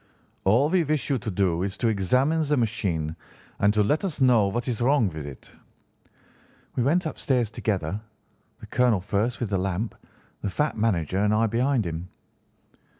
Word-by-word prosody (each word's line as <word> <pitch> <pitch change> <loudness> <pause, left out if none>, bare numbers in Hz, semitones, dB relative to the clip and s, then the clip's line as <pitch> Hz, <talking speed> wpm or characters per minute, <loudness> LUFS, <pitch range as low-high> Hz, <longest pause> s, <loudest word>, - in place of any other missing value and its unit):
All 115 +9 +4
we 180 0 +3
wish 150 -1 -1
you 135 - +1
to 110 - -4
do 90 -3 +1
is 95 +1 -3
to 120 - 0
examine 125 - +2
the 150 -1 +1
machine 90 -9 -1 0.4
and 100 +1 +4
to 105 - +4
let 150 - +1
us 185 -7 -3
know 120 -6 +5
what 120 +6 -2
is 120 -2 -2
wrong 125 -4 +3
with 80 -3 -7
it.' 70 - -11 1.2
"We - - 0
went 165 +8 +2
upstairs 125 -7 0
together, 100 -2 -2 0.6
the - - -10
colonel 125 -5 +2
first 105 +5 -1
with 115 -4 -3
the 95 - +1
lamp, 95 +4 -2 0.5
the 100 - -2
fat 150 +10 -1
manager 95 -5 0
and 105 +1 +2
I 110 +1 +3
behind 120 +1 +1
him. 85 +2 -5
110 Hz, 175 wpm, -25 LUFS, 95-130 Hz, 1.2 s, know